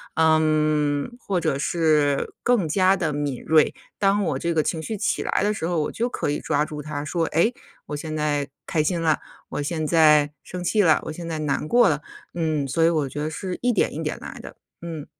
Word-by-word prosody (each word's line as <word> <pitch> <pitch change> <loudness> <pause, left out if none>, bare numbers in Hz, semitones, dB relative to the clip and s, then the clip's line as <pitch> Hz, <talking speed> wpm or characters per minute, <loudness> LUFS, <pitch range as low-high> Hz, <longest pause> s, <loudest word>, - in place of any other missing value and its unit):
嗯， 155 - +2
或 190 -6 -1
者 140 - 0
是 150 -3 +1
更 240 -9 +2
加 185 +4 +3
地 160 -5 -1
敏 145 -3 -3
锐， 155 -1 +4 0.3
当 200 0 +3
我 180 - -1
这 170 0 -1
个 155 -2 +2
情 160 0 -2
绪 215 +7 -4
起 210 - 0
来 - - 0
的 210 +1 +2
时 165 -5 -3
候， 170 -2 0
我 150 - -2
就 235 - -1
可 240 - -2
以 145 - -1
抓 150 +1 0
住 150 -2 -7
它 145 -1 -5
说： 165 +2 0
“诶， 170 +10 +3 0.3
我 150 - -4
现 155 +1 -5
在 145 -2 0 0.2
开 155 - 0
心 170 +2 0
了， 155 -2 +2 0.3
我 - - -3
现 155 +1 -2
在 150 -3 +5
生 180 - -7
气 210 +4 +2
了， 165 -5 +4
我 - - -4
现 170 +2 -7
在 160 -2 -3
难 150 0 -1
过 240 +7 +5
了。 150 -1 -1 0.3
“嗯， 155 -4 0
所 150 +5 +1
以 165 - +6
我 155 -5 0
觉 145 - -5
得 155 - -1
是 180 +3 -5
一 245 - +2
点 230 - +1
一 - - -4
点 - - -3
来 - - -8
的， - - -10 0.3
嗯。 165 -3 -6
155 Hz, 240 characters per minute, -24 LUFS, 150-175 Hz, 0.3 s, 以